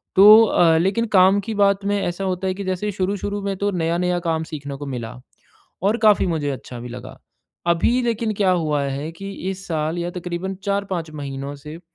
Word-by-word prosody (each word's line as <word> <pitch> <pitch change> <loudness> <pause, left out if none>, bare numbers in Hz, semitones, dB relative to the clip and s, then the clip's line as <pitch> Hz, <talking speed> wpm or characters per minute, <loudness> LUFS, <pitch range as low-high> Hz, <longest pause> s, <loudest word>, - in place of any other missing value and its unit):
तो 210 +3 +9
अ, 165 -5 +4
लेकिन 195 +7 +1
काम 190 +2 +6
की 220 +2 -5
बात 200 -1 +2
में 205 0 +1
ऐसा 175 +2 -3
होता 185 0 -2
है 185 - 0
कि 200 - -5
जैसे 185 +3 -2
शुरू-शुरू 200 +1 -2
में 200 -1 -2
तो 205 +2 0
नया-नया 175 0 0
काम 160 -1 0
सीखने 145 -3 -7
को 145 - -7
मिला, 120 -3 -6 0.6
और 210 +4 +2
काफ़ी 215 -4 +4
मुझे 155 -4 -1
अच्छा 125 -2 -8
भी 125 - -7
लगा। 125 +1 -9 0.5
अभी 170 +9 +2
लेकिन 230 -2 -1
क्या 195 -2 +2
हुआ 155 -5 +1
है 140 +3 -4
कि 195 +4 -7 0.2
इस 195 +1 -8
साल 160 0 -2
या 175 0 -2
तकरीबन 180 +2 -4
4-5 195 -5 -2
महीनों 140 -1 -6
से, 150 +3 -10
180 Hz, 195 wpm, -21 LUFS, 155-200 Hz, 0.6 s, तो